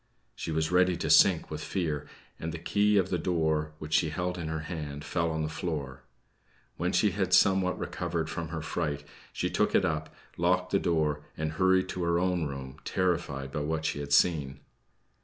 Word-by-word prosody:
She - - -6
was 80 +1 0
ready 90 -1 +4
to 80 -3 -1
sink 85 0 +5
with 75 0 -4
fear, 75 -6 -2 0.3
and 80 - -4
the 85 - -5
key 105 +5 +2
of 95 -2 +2
the 90 - +1
door, 80 -3 0
which 75 0 -7
she 80 - +3
held 90 +4 -2
in 85 -3 -4
her 80 0 -3
hand, 75 -3 -6
fell 85 0 0
on 80 -1 -2
the - - -1
floor. 75 -5 -4 0.7
When 90 +2 -1
she 105 0 +3
had 95 -1 -1
somewhat 95 -1 +4
recovered 85 -2 -3
from 80 +1 -4
her 80 0 -5
fright, 75 -3 -2 0.3
she - - -2
took - - +1
it - - +4
up, 80 0 -2 0.3
locked 90 +2 +1
the 100 - +3
door 75 -3 +1 0.2
and 80 0 -2
hurried 95 +3 +3
to 90 - -3
her 85 0 +2
own 90 -2 +1
room, 70 0 -7
terrified 85 -7 -1
by 75 - -2
what 80 +1 -2
she 75 - -1
had 70 0 -6
seen. 70 -3 +3
80 Hz, 195 wpm, -29 LUFS, 75-90 Hz, 0.7 s, sink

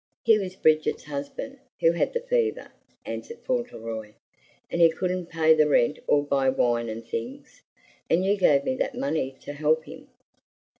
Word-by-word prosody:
"He 220 -2 +5
was 185 -2 -5
Bridget's 155 -4 +2
husband, 150 - -6 0.2
who 165 - +4
had 170 - 0
the 480 - -1
fever," 485 -3 -1 0.3
answered 465 - -6
Fauntleroy; 115 - -4 0.6
"and 170 - 0
he 165 - +8
couldn't 180 +1 -2
pay 160 -2 +4
the 155 -1 +4
rent 145 0 +2
or 145 - +3
buy 135 -2 +2
wine 120 -3 +1
and 115 +1 -6
things. 115 0 -6 0.5
And 180 +3 +2
you 200 +1 +3
gave 145 -8 +3
me 260 - 0
that 255 - -2
money 160 - -2
to 145 - -7
help 155 +2 +1
him." - - -12
160 Hz, 165 wpm, -26 LUFS, 140-195 Hz, 0.6 s, he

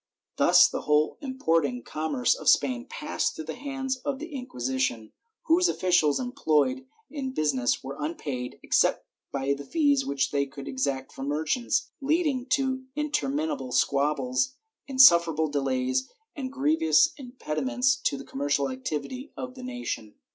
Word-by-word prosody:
Thus - - +7
the - - -4
whole 150 +1 +1
importing 165 - 0
commerce 160 - 0
of - - 0
Spain 255 0 +2
passed 300 0 -2
through 155 - -6
the 160 - -4
hands 265 -1 -3
of 275 +1 -3
the 315 +2 -8
Inquisition, 130 - -2 0.3
whose 345 +2 +3
officials 175 -6 +2
employed 255 - 0 0.2
in 285 -3 -4
the - - -3
business 140 - 0
were 135 +1 -6
unpaid, 140 -5 -4
except - - +2 0.3
by 140 0 0
the 140 0 -6
fees 285 - +2
which 140 -1 -1
they 140 -1 0
could 140 0 -10
exact 130 0 -2
from 135 - -6
merchants, 155 - 0
leading 285 -3 0
to 260 0 0
interminable 150 - -2
squab 140 +4 +2
bles, 130 - -1 0.3
insufferable 170 - +6
delays 130 -2 0 0.3
and 260 -3 -5
grievous 270 - +3
impediments 255 - -1
to 200 - -1
the - - -9
com 135 - -8
mercial 140 -2 +1
activity 150 - -5
of 255 0 -5
the 255 - -11
nation. 245 - -5
160 Hz, 145 wpm, -27 LUFS, -, 0.3 s, Thus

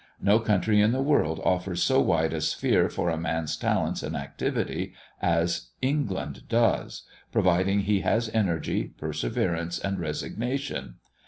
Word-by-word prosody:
No 100 +3 +4
country 105 -1 +2
in 110 +3 +4
the 130 - 0
world 110 - +2
offers 90 -1 +1
so - - +4
wide 80 0 +2
a 80 - -2
sphere 80 - +2
for 85 - -1
a 80 - -2
man's 80 -1 -1
talents - - 0
and - - -4
activity 70 0 -3 0.3
as 85 -6 +1
England 130 -8 -2
does, 115 -1 +1 0.3
provided 95 +3 +3
he 100 0 +2
has 115 +1 +1
energy, 95 -8 0
perseverance, 85 +6 -2
and 95 +2 -2
resignation. 120 - -3
95 Hz, 140 wpm, -27 LUFS, 85-110 Hz, 0.3 s, No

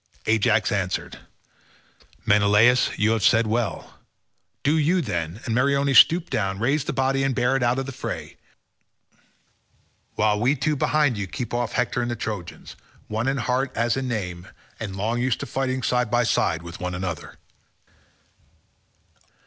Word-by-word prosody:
Ajax 110 0 +2
answered, 95 -3 -2 1.1
"Menelaus, 105 +4 +4
you 110 +1 +2
have 115 -1 0
said 115 +3 +4
well: 110 0 -3 0.6
do 145 +3 +2
you, 160 +4 +2
then, 85 - -3
and 115 - -2
Meriones 140 0 +4
stoop 170 +1 +5
down, 95 -2 -1
raise 135 +7 0
the - - -2
body, 135 +1 0
and 135 -2 0
bear 125 +2 +1
it 135 - 0
out 120 +1 +2
of 135 - -2
the 135 - -6
fray, - - -6 1.8
while 105 -1 +2
we 130 +6 +2
two 150 +3 0
behind 145 -4 +1
you 100 - -3
keep 120 +6 -6
off 120 0 -1
Hector 125 0 0
and 120 - -2
the 120 - -2
Trojans, 105 -6 -6 0.3
one 110 +3 -2
in 135 +1 0
heart 130 +2 -1
as 115 0 +1
in 135 -1 -3
name, 90 -6 -4 0.3
and 100 -3 -5
long 115 +5 -1
used 130 -1 0
to - - -3
fighting 130 -1 -2
side 125 -2 +1
by 120 +2 +2
side 85 -7 0
with 85 0 -9
one 90 -1 -4
another." 90 -4 -5
120 Hz, 160 wpm, -24 LUFS, 105-130 Hz, 1.8 s, stoop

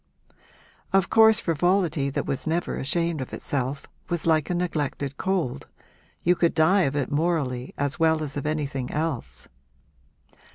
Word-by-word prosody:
Of 195 -1 +2
course 220 0 +6
frivolity 170 -4 +1
that 140 - -2
was 135 - -3
never 170 +2 -1
ashamed 165 +2 -1
of 130 - -7
itself 140 0 -3 0.2
was 175 -2 -2
like 160 -2 +2
a 180 - 0
neglected 145 -5 -2
cold 185 -10 -2 0.6
you 175 - +4
could 170 -1 +1
die 185 +5 +4
of 140 - -7
it 145 -1 -1
morally 145 -5 -1
as 145 0 -1
well 160 -1 +3
as 145 -2 -5
of 145 +1 -3
anything 140 -4 -2
else. 135 - -4
155 Hz, 150 wpm, -25 LUFS, 140-175 Hz, 0.6 s, course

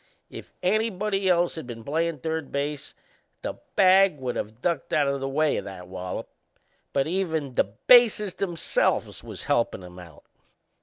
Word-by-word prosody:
If - - -10
anybody 200 -1 +1
else 175 -1 +3
had 160 -6 -7
been 115 -2 -8
playin' 165 +4 -1
third 160 -2 -3
base 145 0 -3 0.5
the - - -5 0.2
bag 190 -3 +5
would 130 -2 -3
of 110 +2 -5
ducked 165 -1 -2
out 145 -2 +3
o' 140 0 0
the 135 0 -3
way 150 +2 +1
o' - - -4
that 95 -2 -9
wallop; 90 0 -5 0.6
but 135 -1 +1
even 160 -6 -2
the - - +3
bases 210 - +4
themselves 175 -4 0
was - - -8
helpin' 95 - 0
him 90 0 -11
out. 85 -4 -14
155 Hz, 160 wpm, -26 LUFS, 125-185 Hz, 0.6 s, bag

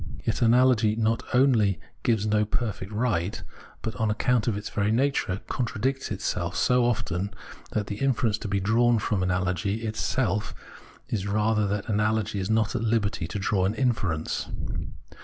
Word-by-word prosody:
Yet - - -1
analogy 120 -2 +4
not 115 0 +1
only 115 - +3 0.2
gives 110 -3 +1
no 105 0 +2
perfect 105 -2 -3
right, 105 -5 0 0.4
but, 115 - -2
on 110 -1 +1
account 115 +1 +1
of 110 -4 +1
its 105 - -5
very 105 -1 0
nature, 120 -6 +1
contradicts 130 +2 -2
itself - - -2
so 125 -1 +3
often 100 -4 -1 0.4
that 105 - 0
the 100 - -5
inference 110 -4 +1
to 110 - -5
be 100 0 0
drawn 115 +4 +3
from 105 -2 0
analogy 90 +3 0
itself 105 -1 -1 0.7
rather 105 +1 +2
is - - -1
that 105 +2 -2
analogy 105 -1 0
is 95 - -3
not 110 +1 +1
at 120 - 0
Hberty 110 -6 0
to - - -4
draw 95 -1 +1
an 100 +3 0
inference. 100 -11 -1
110 Hz, 160 wpm, -26 LUFS, 100-115 Hz, 0.7 s, analogy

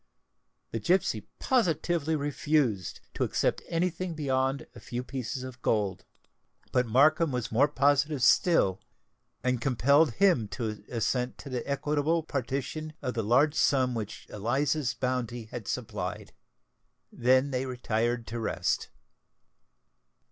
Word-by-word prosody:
The 115 - -2
gipsy 180 - +1
positively 170 - +1
refused 145 - 0
to - - -1
accept - - 0
any 175 +2 +1
thing 175 0 -5
beyond 135 -2 0
a - - -11
few 125 +1 -5
pieces 130 0 -4
of 130 -1 -9
gold; 100 -6 0 0.7
but 125 -1 +2
Markham 155 +7 +4
was 125 -2 -3
more 130 +6 +4
positive 145 0 +2
still, 115 - +4 0.6
and 125 -1 0
compelled 140 +3 +3
him 175 - +3
to 110 -3 -4
assent 125 +1 -1
to 140 - -9
the 125 +1 -4
equitable 150 +3 +1
partition 140 +2 -3
of 125 - -2
the 115 - -1
large 130 +8 +3
sum 130 -5 +2
which 110 -3 -5
Eliza's 130 +5 0
bounty 125 -2 -2
had 120 -5 -6
supplied. - - -4 0.8
They 130 +2 +4
then 140 +1 -5 0.2
retired 120 -1 -1
to 115 +1 -5
rest. 110 - -1
130 Hz, 125 wpm, -29 LUFS, 120-150 Hz, 0.8 s, Markham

